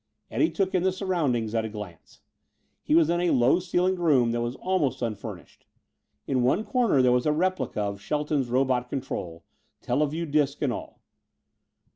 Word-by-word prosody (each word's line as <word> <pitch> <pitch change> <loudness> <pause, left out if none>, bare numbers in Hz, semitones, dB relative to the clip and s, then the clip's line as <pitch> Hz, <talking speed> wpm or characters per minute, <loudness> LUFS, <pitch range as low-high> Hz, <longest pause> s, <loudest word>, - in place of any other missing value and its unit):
Eddie 320 - +2
took 195 -2 -1
in 185 - +2
the 190 +1 +2
surroundings 155 - -1
at 115 -1 +1
a 110 - -4
glance. 105 -6 -10 0.6
He 150 - +1
was 165 -2 +5
in 175 0 +1
a 175 - +2
low 125 +5 +4
ceilinged 180 +1 0
room 135 -9 +3
that 120 0 -1
was 120 +2 -3
almost 180 -10 -1
unfurnished. 110 -4 -7 0.6
In 130 -2 0
one 135 - +2
corner 230 - +2
there 125 - +4
was 125 +3 +2
a - - +4
replica 180 -6 -1
of 100 -1 -4
Shelton's 145 +3 -1
robot 125 -1 +1
control, 85 -11 -5 0.4
teleview 150 +6 -1
disc 145 -2 0
and 130 -4 +1
all. - - -8
140 Hz, 170 wpm, -26 LUFS, 120-175 Hz, 0.6 s, was